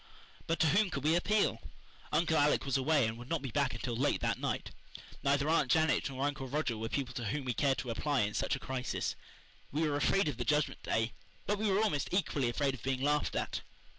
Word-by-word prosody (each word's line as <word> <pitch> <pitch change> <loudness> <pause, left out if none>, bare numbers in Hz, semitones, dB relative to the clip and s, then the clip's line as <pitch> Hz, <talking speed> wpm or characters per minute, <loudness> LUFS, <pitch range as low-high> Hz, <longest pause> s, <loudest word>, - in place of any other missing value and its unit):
But 165 - 0
to 160 - +5
whom 200 +5 +3
could 140 -6 -4
we 155 +2 +3
appeal? 210 +4 +2 0.5
Uncle 165 -1 +2
Alec 145 -1 +3
was 135 - 0
away 140 0 +3
and 110 +1 -3
would 120 +2 -10
not 165 -4 -1
be 135 - -4
back 140 0 +1
until 120 -2 -3
late 135 +5 +1
that - - 0
night. - - -2 0.5
Neither 140 +1 +2
Aunt 155 -5 +2
Janet 160 +2 +3
nor 135 +1 -2
Uncle 140 -2 -2
Roger 140 -3 -1
were 110 +1 -4
people 130 -2 -2
to 120 -1 -4
whom 135 +6 -2
we 125 - 0
cared 135 +2 +2
to 125 - -3
apply 140 +4 0
in 105 0 0
such - - 0
a - - -6
crisis. 130 -2 -3 0.6
We 155 +2 +1
were 145 - 0
afraid 195 +4 +2
of 145 - -2
the 125 - -1
Judgment 150 +2 +1
Day; 115 +1 0 0.3
but 205 0 0
we 215 -1 +1
were 200 +3 +3
almost 150 -11 0
equally 150 -9 +1
afraid 135 +3 0
of 130 - -8
being 130 0 -1
laughed 150 +1 +1
at. - - -2
140 Hz, 230 wpm, -33 LUFS, 130-155 Hz, 0.6 s, to